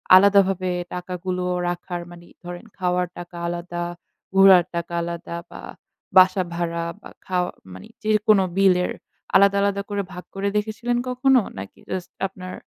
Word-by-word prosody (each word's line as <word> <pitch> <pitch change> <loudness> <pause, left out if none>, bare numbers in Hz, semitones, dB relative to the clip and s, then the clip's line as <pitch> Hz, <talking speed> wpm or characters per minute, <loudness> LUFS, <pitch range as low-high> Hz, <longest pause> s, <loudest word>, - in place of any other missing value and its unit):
আলাদাভাবে 195 -1 +5 0.3
টাকাগুলো 180 0 -4 0.3
রাখার, 175 0 -4
মানে 175 0 -13 0.2
ধরেন 175 +4 -7
খাওয়ার 180 -1 0
টাকা 175 0 -9
আলাদা, 175 0 -4 0.5
ঘোরার 190 -2 +8
টাকা 170 0 -3
আলাদা 170 0 -5 0.2
বা - - -9 0.6
বাসা 185 +1 +7
ভাড়া 170 0 -2 0.2
বা - - -11 0.2
খাওয়া, 180 -1 0 0.2
মানি 95 - -11
যেকোন 215 -1 +4 0.2
বিলের 185 -2 +4 0.4
আলাদা, 200 +1 +6
আলাদা 200 0 +1
করে 205 -1 -1
ভাগ 180 0 -8
করে 195 +1 -1
দেখেছিলেন 220 +3 -1
কখনো? 255 +1 +4 0.2
নাকি 95 +1 -8
জাস্ট 185 -2 -4 0.2
আপনার 185 -1 -9
185 Hz, 135 wpm, -23 LUFS, 175-200 Hz, 0.6 s, ঘোরার